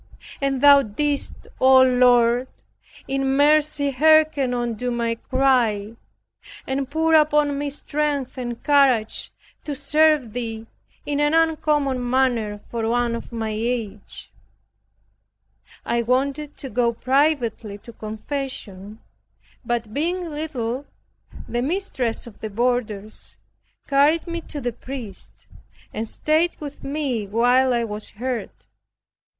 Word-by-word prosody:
And 275 -2 0
thou 285 -1 +8
didst, 280 +5 -3
O 260 0 +7
Lord, 245 -1 +4 0.6
in 270 0 0
mercy 295 -1 +3
hearken 310 -2 +4
unto 240 0 -2
my 235 -1 -1
cry, 230 -4 +1 0.7
and 265 0 -2
pour 320 +2 +1
upon 300 -2 +4
me 290 0 -2
strength 290 -1 -2
and 240 -2 -5
courage 270 -7 +2 0.3
to 290 - -4
serve 295 -3 +2
thee, 225 -2 -4 0.4
in 290 -1 -1
an 295 +2 +2
uncommon 300 -5 +1
manner 240 -5 +1
for 225 -1 -1
one 240 0 +1
of 235 - -6
my 225 -2 -3
age. 215 -2 -4 1.5
I 235 - +1
wanted 275 +5 -1
to 270 - -7
go 235 +1 +1
privately 255 -5 0
to 235 +3 -13
confession, 215 -3 -6 0.6
but 235 -2 -3
being 345 +4 -2
little, 280 -4 -4 0.6
the 240 - -2
mistress 265 - -2
of 235 -3 -13
the 220 - -5
boarders 220 -2 -2 0.5
carried 290 +4 +3
me 340 -1 -4
to 295 - -5
the 245 -3 -3
priest, 245 -4 -9 0.5
and 225 +1 -3
stayed 315 +8 +1
with 290 -2 -8
me 275 -7 -2
while 245 +5 +3
I 240 -1 +1
was 210 -1 -5
heard. 245 +2 -4
255 Hz, 120 wpm, -22 LUFS, 230-290 Hz, 1.5 s, thou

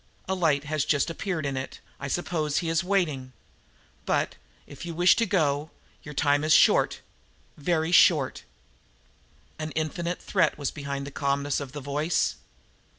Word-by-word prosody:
"A 190 - 0
light 160 -6 +1
has 155 -1 -1
just 155 +2 +1
appeared 165 -3 -3
in 140 -1 -2
it. 130 0 -5 0.2
I 140 - -4
suppose 155 -1 -1
he 170 - 0
is 165 +2 +1
waiting. 155 -10 -1 0.7
But, - - +1 0.3
if - - -11
you 170 -1 -5
wish 175 +2 +5
to 230 - +2
go, 150 -5 +1 0.3
your 150 -1 -10
time 145 0 +2
is 155 0 +4
short - - +4 0.5
very 160 +2 0
short!" 150 -6 +4 1.2
An 155 0 -3
infinite 170 +3 -2
threat - - +1
was 145 -2 -2
behind 140 -1 -5
the 140 - -7
calmness 140 0 0
of 140 -2 -7
the 145 - -6
voice. 150 +4 0
155 Hz, 155 wpm, -26 LUFS, 140-170 Hz, 1.2 s, wish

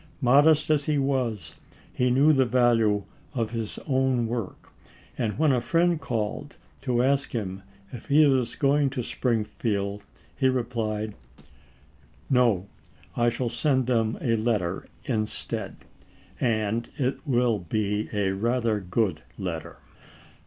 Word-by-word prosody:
Modest 145 +4 +5
as 145 -2 +2
he 150 -1 +1
was, 130 - -1 0.4
he 125 0 +1
knew 140 +5 +5
the 135 -3 +3
value 115 -4 +3 0.3
of 115 -3 -1
his 115 -2 -4
own 130 -3 +2
work, 115 -4 -5 0.4
and 110 -3 -2
when 155 -2 +3
a 125 -2 +2
friend 170 +3 +2
called 110 -4 -3 0.3
to 120 -1 +1
ask 140 +1 +1
him 100 -5 -3 0.3
if 120 - -9
he 150 +1 +6
was 130 -4 +2
going 140 0 +2
to 130 -2 -4
Springfield 105 -4 -1 0.3
he 130 - +2
replied, 115 -4 -2 1.2
"No, 120 -8 +3 0.5
I 120 0 +3
shall 120 +1 -2
send 130 +3 +1
them 115 -2 +1
a 115 -2 +1
letter 105 -6 -1 0.2
instead; 110 -4 -3 0.6
and 110 -1 0
it 135 -2 -1
will 120 -4 +2
be 105 +3 -2
a 100 -2 0
rather 115 +2 0
good 95 -3 -1 0.2
letter." 90 -5 -5
120 Hz, 130 wpm, -26 LUFS, 110-130 Hz, 1.2 s, he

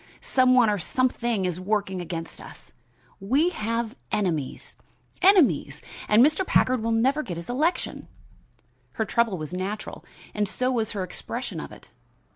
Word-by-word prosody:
Some 255 -1 +4
one 245 -3 +6
or 205 -1 +1
something 240 0 0
is 180 -1 -2
working 195 -2 -1
against 165 -1 -6
us. - - -13 0.5
We 270 - +2
have 230 -5 -3 0.2
enemies 175 -10 -2 0.5
enemies, 375 -6 +4 0.3
and 220 +4 +7
Mr. 310 +5 +2
Packard 255 -8 +2
will 230 +1 -1
never 260 +7 +2
get 175 - -6
his 170 +7 -6
election." 310 +8 -1 0.9
Her 220 - -1
trouble 230 -3 +1
was 155 +1 -6
natural 195 +4 -5 0.3
and 210 -2 -1
so 255 +1 0
was 225 -3 -1
her 200 -3 -2
expression 185 - -5
of - - -7
it. - - -15
220 Hz, 150 wpm, -25 LUFS, 190-255 Hz, 0.9 s, and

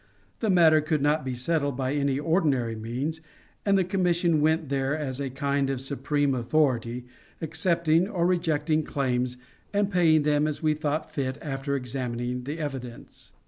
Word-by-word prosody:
The 220 - 0
matter 165 -4 +6
could 155 -1 0
not 150 +1 +2
be 130 -1 -3
settled 140 +1 -1
by 130 0 -1
any 140 -2 +1
ordinary 145 -8 +1
means, 130 +9 -4 0.5
and 200 -1 +5
the 190 - +3
commission 175 -3 +1
went 160 -1 +1
there 135 +1 0
as 135 -4 -4
a 140 -1 -2
kind 140 +1 -1
of 135 -2 -1
supreme 140 +1 0
authority, 125 -2 0 0.3
accepting 165 +1 +1
or 170 -5 0
rejecting 160 -3 +1
claims 125 -4 -1 0.3
and 205 0 +1
paying 160 -4 +4
them 150 0 +2
as 155 +2 -4
we 155 -1 +3
thought 155 0 -3
fit 130 -2 -2
after 140 -1 -3
examining 125 -1 -3
the 145 +4 -4
evidence. 135 -6 -7
145 Hz, 160 wpm, -26 LUFS, 130-160 Hz, 0.5 s, matter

